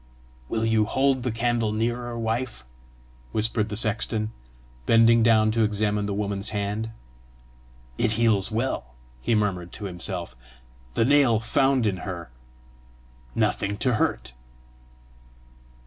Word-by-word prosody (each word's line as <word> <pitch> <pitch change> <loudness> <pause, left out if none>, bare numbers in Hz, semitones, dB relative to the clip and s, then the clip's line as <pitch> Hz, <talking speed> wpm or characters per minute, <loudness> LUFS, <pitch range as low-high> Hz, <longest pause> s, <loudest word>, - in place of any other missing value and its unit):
"Will 115 0 0
you 110 -1 +3
hold 135 +3 +1
the 125 0 -1
candle 115 -1 0
nearer, 120 +2 -2
wife?" 115 - -3 0.7
whispered 110 0 0
the 105 - -3
sexton, 110 0 0 0.6
bending 115 0 +6
down 110 -1 +4
to 115 0 +2
examine 105 -1 0
the 100 - -2
woman's 100 -1 -2
hand. 105 +2 -2 1.1
"It 115 -2 +2
heals 110 -4 +2
well," 110 - -2 0.3
he 115 - +1
murmured 95 -5 -1
to 105 - -6
himself: 90 -4 -4 0.6
"the 115 - +3
nail 135 -5 +4
found 135 +2 +2
in 100 -3 0
her 85 -7 -6 1.0
nothing 100 +1 0
to 125 +2 +2
hurt!" 60 - -1
110 Hz, 120 wpm, -25 LUFS, 100-115 Hz, 1.1 s, bending